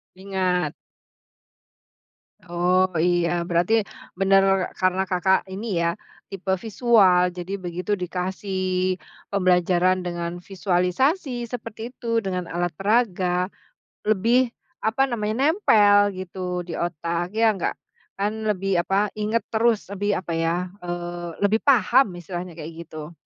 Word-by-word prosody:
Ingat. 185 -4 -1 1.7
Oh 180 +2 +2
iya 175 +1 +2 0.2
berarti, 175 +5 +1 0.5
bener 195 0 +5 0.4
karena 185 0 +2
Kakak 190 +1 +2
ini 200 -2 -3
ya 170 - +2 0.4
tipe 195 -1 -7 0.2
visual 195 -6 +4
jadi 180 +2 -6
begitu 180 +3 -4
dikasih, 185 0 -2 0.3
pembelajaran 185 -1 +3
dengan 175 0 -4
visualisasi 225 - 0
seperti 225 -2 -7
itu 235 - -10 0.2
dengan 180 -2 -3
alat 175 0 -1
peraga, 185 -3 +1 0.6
lebih, 230 +4 +3 0.3
apa 235 +5 +2
namanya 215 -3 -2 0.2
nempel 205 - +5
gitu 180 -1 -4
di - - -5
otak 170 +1 -2
ya 230 - +5
nggak, 175 - -1 0.4
kan 205 +2 0 0.2
lebih 195 -1 -1
apa 195 - -1 0.2
inget 220 +2 +1
terus 225 -1 +2
lebih 205 +1 -1
apa 170 - -6
ya, 165 0 +1 0.3
eee, 175 -1 -5
lebih 215 +2 +3
paham 265 -1 +5
istilahnya 175 +1 -6
kayak 155 +1 -7
gitu. 155 0 -9
185 Hz, 115 wpm, -24 LUFS, 175-210 Hz, 1.7 s, bener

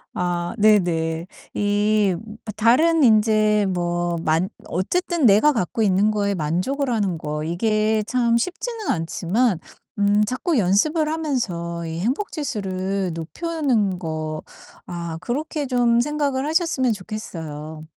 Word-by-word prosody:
아 175 -1 -1
네네. 170 -6 +2 0.3
이 205 -1 +2 0.4
다른 310 +9 +4
인제 215 -2 +4
뭐 175 -1 -1
만 160 +4 +1 0.2
어쨌든 340 - 0
내가 220 +8 +6
갖고 225 +1 -1
있는 200 +1 +3
거에 200 -1 0
만족을 185 - -1
하는 200 -7 0
거 150 0 -4
이게 215 +5 +1
참 235 -2 +2
쉽지는 435 - -3
않지만 185 +6 0 0.4
음 205 +1 +3
자꾸 265 - -1
연습을 300 - +2
하면서 195 - -2
이 160 +1 -4
행복지수를 200 - -2
높이는 235 - -1
거 155 -2 -4 0.4
아 170 -2 -5
그렇게 290 +6 -3
좀 240 -2 +3
생각을 285 -1 -1
하셨으면 310 -7 +1
좋겠어요. 160 -7 -7
210 Hz, 235 characters per minute, -22 LUFS, 175-255 Hz, 0.4 s, 내가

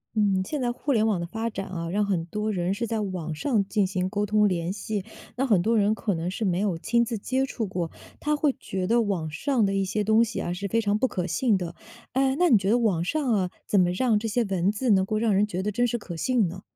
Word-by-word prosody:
嗯， 195 -3 +2
现 295 +3 -3
在 240 -1 +1
互 280 +4 -3
联 220 -2 +3
网 205 -5 +1
的 170 - -3
发 225 +6 -3
展 205 -3 -5
啊， 165 -2 -4
让 205 +4 +1
很 190 -5 0
多 210 +5 -2
人 180 -2 -1
是 235 +3 -2
在 225 -1 -2
网 180 -6 -3
上 205 - 0
进 205 -2 +1
行 185 -1 -1
沟 205 +1 -1
通 210 0 +4
联 175 -2 -1
系， 205 0 -3 0.3
那 270 +2 +1
很 200 -7 +3
多 230 +3 +2
人 210 0 +3
可 210 -2 -1
能 165 +1 -2
是 200 +4 -3
没 180 -2 +1
有 195 -4 0
亲 235 +7 +2
自 230 -1 -3
接 260 +6 -1
触 230 -4 -3
过， 180 -4 -3 0.3
他 300 0 0
会 295 -2 +1
觉 190 -1 -3
得 235 +5 +3
网 185 -8 -2
上 235 - +1
的 195 - 0
一 195 0 +1
些 205 +3 -1
东 220 +2 +4
西 235 - -3
啊 175 - -2
是 195 +3 -4
非 230 +4 +1
常 210 -1 +1
不 260 - +3
可 180 -7 -3
信 205 +5 +1
的。 175 -2 -5 0.4
哎， 265 +1 +2
那 355 +1 +4
你 225 - +7
觉 195 0 -1
得 230 - +4
网 205 -9 +1
上 270 - 0
啊， 190 -4 +1 0.2
怎 205 - +2
么 175 - +3
让 215 +4 +2
这 225 - -3
些 235 +3 +1
文 190 -2 +1
字 230 +3 0
能 190 -2 +5
够 215 +3 -1
让 220 -1 +2
人 200 +2 +3
觉 185 -2 -3
得 210 - -1
真 245 +4 +1
实 240 - -1
可 185 -6 -8
信 230 +2 +1
呢？ 185 +3 -8
205 Hz, 295 characters per minute, -26 LUFS, 185-230 Hz, 0.4 s, 你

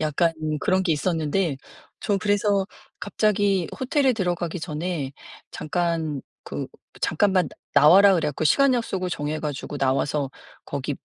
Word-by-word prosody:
약간 155 +2 +1 0.3
그런 190 0 +2
게 180 -3 +1
있었는데 160 0 0 0.4
저 205 -2 0
그래서 205 -1 +1 0.3
갑자기 205 -4 +1
호텔에 265 0 +2
들어가기 175 -4 -2
전에 155 -3 -3 0.4
"잠깐 165 -3 -2 0.2
그 - - -5 0.3
잠깐만 190 -5 +2 0.3
나와라." 195 +7 +7
그래 165 -3 +1
갖고 150 +2 -3
시간 275 - +4
약속을 190 -6 -2
정해 150 -1 -3
가지고 145 -1 -5
나와서 135 +1 0 0.4
거기 140 0 -3
175 Hz, 285 characters per minute, -24 LUFS, 150-200 Hz, 0.4 s, 나와라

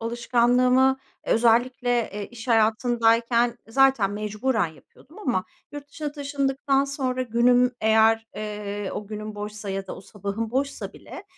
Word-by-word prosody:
alışkanlığımı 245 +3 +2 0.3
özellikle, 245 +2 +2 0.2
eee, 205 0 -5
iş 240 +1 -10
hayatındayken 230 +1 +2
zaten 265 -5 +3
mecburen 215 +1 -1
yapıyordum 260 - -17
ama 245 - -1 0.3
yurt 290 0 -8
dışına 295 -1 -5
taşındıktan 275 -1 0
sonra 260 -2 -2
günüm 245 +1 +3
eğer, 220 +1 +3
eee, 205 -1 -5
o 210 - -5
günüm 215 0 -6
boşsa 210 0 -6
ya 195 0 -4
da - - -7
o - - -10
sabahım 205 +3 -5
boşsa 275 +3 -3
bile - - -11
235 Hz, 130 wpm, -24 LUFS, 215-260 Hz, 0.3 s, zaten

